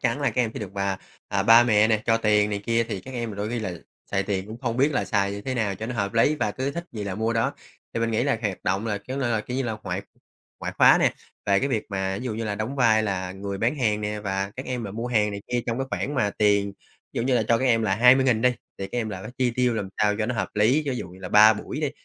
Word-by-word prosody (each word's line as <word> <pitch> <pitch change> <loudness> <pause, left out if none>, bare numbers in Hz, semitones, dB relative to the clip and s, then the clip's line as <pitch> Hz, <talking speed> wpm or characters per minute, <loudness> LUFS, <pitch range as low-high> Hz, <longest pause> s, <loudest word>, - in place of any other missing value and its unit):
chắn 125 +3 0
là 140 - +2
các 125 - +1
em 115 - -1
sẽ - - -4
được 100 -3 -6
mà, 100 -1 -1 0.3
à, 100 - 0
ba 115 +4 +8
mẹ 110 -2 +4
nè, 110 -2 +1
cho 115 - +4
tiền 105 -2 +2
này 100 - -1
kia, 115 0 +2
thì 100 -4 -3
các 130 - -11
em 120 -2 -3
là 100 - -8
đôi 105 +1 -3
khi 120 +1 -2
là 105 -5 -3 0.4
xài 100 -1 +1
tiền 95 -1 -2
cũng 110 +2 -8
không 120 -3 -2
biết 140 +4 +3
là - - 0
xài 100 -2 0
như 100 - -5
thế 130 +2 -3
nào 105 -5 0
cho 110 +4 -6
nó 125 - -4
hợp 100 -2 -2
lý 115 +6 +4
và 115 -8 -1
cứ 130 +6 -3
thích 170 +4 -5
gì 105 -3 -5
là 100 -2 -3
mua 110 +3 0
đó. 115 0 0 0.4
Thì 115 - -1
mình 115 0 0
nghĩ 110 +1 +1
là 140 -5 +1
hoạt 100 -4 -3
động 95 +4 0
là, 105 -2 -1
kiểu 130 +6 -7
là, 120 -5 0
kiểu 125 +4 -5
như 135 - 0
là, 115 -3 -3
ngoại 95 +1 -3 0.6
ngoại - - -4
khóa - - +7
nè, - - +3 0.3
về 100 -1 +4
cái 140 - 0
việc 110 -5 -1
mà, 95 -2 -2
ví - - -7
dụ 115 - -2
như 115 +1 -3
là, 105 -2 -2
đóng 110 +7 -4
vai 115 -4 +4
là 95 -3 -2
người 100 +1 -5
bán 115 +8 +1
hàng 105 -4 +1
nè, 105 0 -3
và 100 -1 -2
các 130 - -6
em 125 -2 -3
mà 105 - -5
mua 115 +4 -4
hàng 105 -4 +2
này 100 0 -5
kia 120 - +2
trong 115 0 -1
cái 135 - -2
khoản 145 - -2
mà 105 -7 +1
tiền, 100 -1 +3 0.4
ví - - -3
dụ - - 0
như 130 +1 +1
là 120 - +3
cho 115 - +4
các 130 - -1
em 115 -3 +3
là 95 -3 +1
20.000 125 0 +5
đi, 125 - +6 0.3
thì 95 - -3
các 120 - -4
em 115 -2 -2
là 95 -3 -6
phải - - -7
chi 125 -1 +2
tiêu 125 0 +1
làm 105 -3 -3
sao 105 -1 +3
cho 110 - 0
nó 125 - -2
hợp 110 - -1
lý. 115 +9 +3
Ví 130 - -2
dụ 95 - -5
như 90 +2 -14
là 95 - -7
3 105 +3 +8
buổi 120 +7 -5
đi, 150 -3 0
110 Hz, 320 wpm, -25 LUFS, 100-120 Hz, 0.6 s, ba